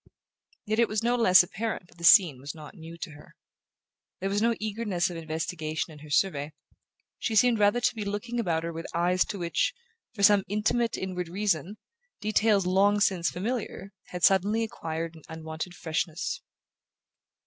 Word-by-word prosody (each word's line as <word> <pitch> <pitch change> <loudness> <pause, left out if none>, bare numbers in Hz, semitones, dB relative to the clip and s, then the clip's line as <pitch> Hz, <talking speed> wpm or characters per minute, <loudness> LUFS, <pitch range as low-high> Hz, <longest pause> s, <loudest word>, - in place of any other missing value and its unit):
Yet 215 +1 -1
it 235 - +5
was 215 +1 -2
no 240 +1 +2
less 185 -7 +7
apparent 200 -1 -4
that 175 - -21
the - - -10
scene 170 -7 +7
was 140 +3 -7
not 155 -2 -11
new 165 -2 -11
to 170 -1 -6
her. 150 0 -15 0.8
There 195 +1 -2
was 205 +1 0
no 230 +1 +2
eagerness 210 -5 -1
of - - -7
investigation 160 0 -4
in 150 - -13
her 150 +1 -12
survey: 150 -2 0 0.7
she 225 - -2
seemed 240 0 +4
rather 205 +3 +4
to 245 - +1
be 220 -3 -4
looking 205 +4 -3
about 165 -7 0
her 170 0 -4
with 165 +1 -6
eyes 180 +2 +3
to 205 - -5
which, 170 -2 0 0.4
for 200 - -3
some 205 -1 +6
intimate 220 +3 0
inward 180 -2 -4
reason, 195 0 -1 0.4
details 210 -2 +2
long 200 +3 +3
since 180 -4 +2
familiar 200 -1 -4
had 180 -1 -7
suddenly 205 +4 +4
acquired 165 -6 -4
an 160 - -14
unwonted 160 +2 -6
freshness. 160 0 -3
185 Hz, 170 wpm, -27 LUFS, 165-210 Hz, 0.8 s, less